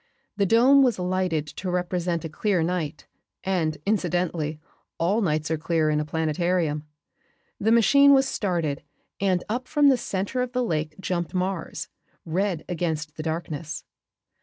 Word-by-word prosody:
The 200 -1 +1
dome 255 +7 +6
was 250 -4 +3
lighted 180 -4 0
to 185 +5 -6
represent 180 -1 -1
a - - -4
clear 185 +1 0
night, 160 -4 -2 0.4
and, 165 -5 0
incidentally, 175 -6 0 0.4
all 195 +7 +1
nights 155 -4 0
are 160 - 0
clear 155 -1 +1
in 150 - +1
a 150 - -1
planetarium. 160 0 0 0.7
The 220 +2 +2
machine 280 +5 +6
was 270 -1 +5
started 170 - -1 0.4
and 185 -2 +1
up 245 +4 -3
from 295 -2 +4
the 265 - +4
center 200 +4 -2
of 250 -1 -3
the 250 0 +1
Lake 155 -7 -2
jumped 175 0 -2
Mars, 185 -2 -2 0.4
red 175 0 -1
against 160 -3 -2
the 155 - -5
darkness. 160 -1 -4
175 Hz, 150 wpm, -25 LUFS, 160-200 Hz, 0.7 s, dome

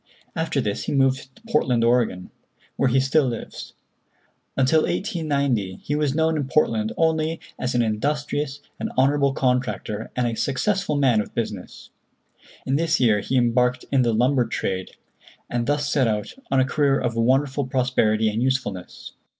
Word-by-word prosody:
After 160 -3 -1
this 105 -5 -2
he - - -2
moved 135 -1 +1
to 225 - -22
Portland, 125 - +1
Oregon, 115 -6 +1 0.4
where 135 - +2
he 130 +2 +3
still 135 +2 +2
lives. 115 -2 -6 0.8
Until 135 +4 +4
1890 140 - -1
he 145 - -2
was 150 -2 0
known 160 0 +2
in 145 -3 -2
Portland 110 -7 +1
only 160 0 +1 0.2
as 125 -1 -2
an 120 - +3
industrious 145 +5 -2 0.2
and - - -3
honorable 140 +1 +3
contractor 125 -5 -1
and 125 - 0
a 120 - -1
successful 180 - 0
man 130 -6 +3
of - - -9
business. 105 -5 -5 0.7
In 135 - +1
this 165 0 +1
year 110 -5 +3
he 130 +6 -1
embarked 125 +1 +2
in 135 -2 +4
the 120 -2 +2
lumber 125 +2 +2
trade, 95 -4 -3 0.6
and 120 -1 -1
thus 145 0 0
set 140 -3 +2
out 105 -1 -2 0.2
on 135 - +2
a 130 - +4
career 140 0 +2
of 120 -2 -2
wonderful 130 +3 +1
prosperity 125 -4 +1
and 110 +2 -1
usefulness. 125 -9 -3
130 Hz, 160 wpm, -23 LUFS, 115-145 Hz, 0.8 s, Until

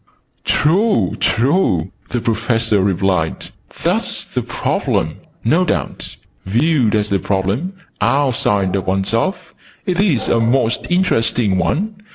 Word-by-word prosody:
"True, 160 - +2
true!" 115 - +1 0.2
the 120 - -2
Professor 115 -2 +1
replied. 95 -3 0 0.3
"That's - - +1
the - - -3
Problem, - - -1 0.3
no 160 +11 +3
doubt. - - -3 0.3
Viewed 120 +2 +2
as 105 -1 0
a 100 - +2
Problem, 100 - -1 0.3
outside 115 -9 +1
of 95 -1 -3
oneself, 115 - -1 0.3
it 180 0 +1
is 170 - +2
a 115 - +2
most 115 +1 +1
interesting 115 - +1
one. 210 - -1
115 Hz, 115 wpm, -18 LUFS, 100-155 Hz, 0.3 s, no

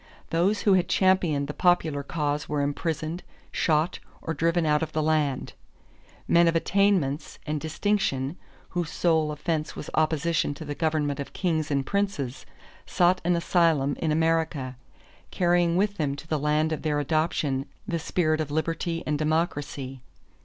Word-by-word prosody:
Those 180 +6 +2
who 200 - +4
had 180 -2 +3
championed 175 -6 +3
the 150 - -4
popular 160 -5 +2
cause 145 0 -2
were 145 -1 0
imprisoned, 155 +3 -2 0.3
shot, 155 +1 +1 0.2
or 165 - -3
driven 165 +2 +1
out 150 0 +3
of 155 -1 -3
the 155 - 0
land. 150 -4 0 0.7
Men 170 0 +5
of 165 - +2
attainments 165 -5 +1
and 150 -1 -2
distinction, 160 -4 0 0.3
whose 175 -3 -2
sole 160 -3 +1
offense 155 +1 -2
was - - -7
opposition 155 -1 +1
to 160 - -8
the 145 - -3
government 150 -2 0
of 140 - -6
kings 160 -5 0
and 140 -2 0
princes, 195 -11 -2 0.4
sought 180 +1 +3
an 175 +1 +2
asylum 165 -5 +2
in 160 - 0
America, 160 -5 0 0.5
carrying 175 -1 +2
with 205 +1 +1
them 145 -3 0
to 150 - -10
the 155 -2 0
land 150 +2 +1
of 155 - -2
their 150 -2 0
adoption 145 -2 0 0.2
the 170 -5 -1
spirit 155 -1 0
of 155 - -3
liberty 165 +2 -2
and 150 -1 -1
democracy. 145 -4 -2
155 Hz, 155 wpm, -26 LUFS, 145-170 Hz, 0.7 s, Men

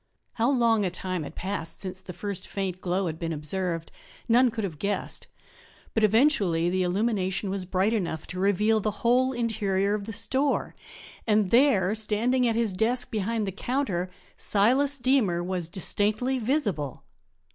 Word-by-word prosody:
How 235 +2 +1
long 235 -5 +3
a 185 - +1
time 185 0 -3
had 150 - -8
passed 170 -4 -4
since 185 -1 -5
the 185 - -8
first 200 +2 -4
faint 190 -2 -4
glow 185 +2 0
had 160 -2 -4
been 165 -1 -3
observed 165 +2 -3 0.4
none 245 +2 +5
could 225 -1 -4
have 165 -7 -4
guessed, 200 0 -3 0.7
but 220 - +1
eventually 205 - +3
the 185 0 +1
illumination 190 0 0
was 190 -2 -2
bright 190 +4 +1
enough 170 -7 -2
to 185 - -6
reveal 210 +3 +3
the 215 - 0 0.2
whole 255 +2 +4
interior 205 -5 0
of 205 -1 -2
the 220 - -5
store; 270 +6 0 0.5
and 210 -3 +2
there, 230 -7 +4
standing 225 +4 +1
at 230 - +1
his 230 -4 +1
desk 245 +6 0
behind 220 0 -1
the 195 - -3
counter, 200 -4 -2 0.3
Silas 260 +8 +3
Deemer 245 -10 +2
was 180 -2 -2
distinctly 215 +8 0
visible! 215 - -1
205 Hz, 160 wpm, -27 LUFS, 185-230 Hz, 0.7 s, none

